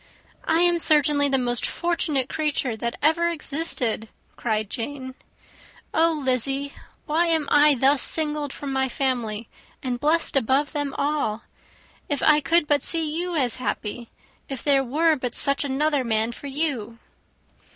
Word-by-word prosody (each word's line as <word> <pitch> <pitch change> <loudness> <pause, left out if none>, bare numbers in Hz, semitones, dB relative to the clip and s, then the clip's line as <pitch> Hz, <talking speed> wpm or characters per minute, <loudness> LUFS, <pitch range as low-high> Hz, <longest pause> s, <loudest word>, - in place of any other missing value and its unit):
"I 325 +1 +3
am 345 -1 +3
certainly 295 -2 +3
the 270 - +2
most 245 -2 0
fortunate 320 -6 -1
creature 290 -6 -1
that 235 +2 -4
ever 335 +3 +3
existed!" 290 -8 -1 0.3
cried 215 -2 -2
Jane. 260 +4 -5 0.8
"Oh, 330 +1 +3
Lizzy, 275 0 -1 0.3
why 330 +3 +1
am 320 -3 +1
I 295 0 +5
thus 270 +2 +3
singled 300 -2 +1
from 275 -1 -6
my 265 0 0
family, 235 -5 -2 0.4
and 250 -2 -3
blessed 315 +3 +1
above 270 +3 +1
them 290 -2 -3
all? 280 -7 -1 0.7
If 290 -2 -2
I 300 -1 +5
could 335 +2 +3
but 290 -2 +2
see 315 -1 +1
you 350 +1 -2
as 255 -6 0
happy! 235 -1 -4 0.4
If 270 -3 -6
there 275 -2 +3
were 310 +5 +2
but 250 -2 -4
such 280 +1 +1
another 285 0 0
man 225 -1 0
for 280 - -9
you!" 270 -6 -3
280 Hz, 150 wpm, -23 LUFS, 250-305 Hz, 0.8 s, I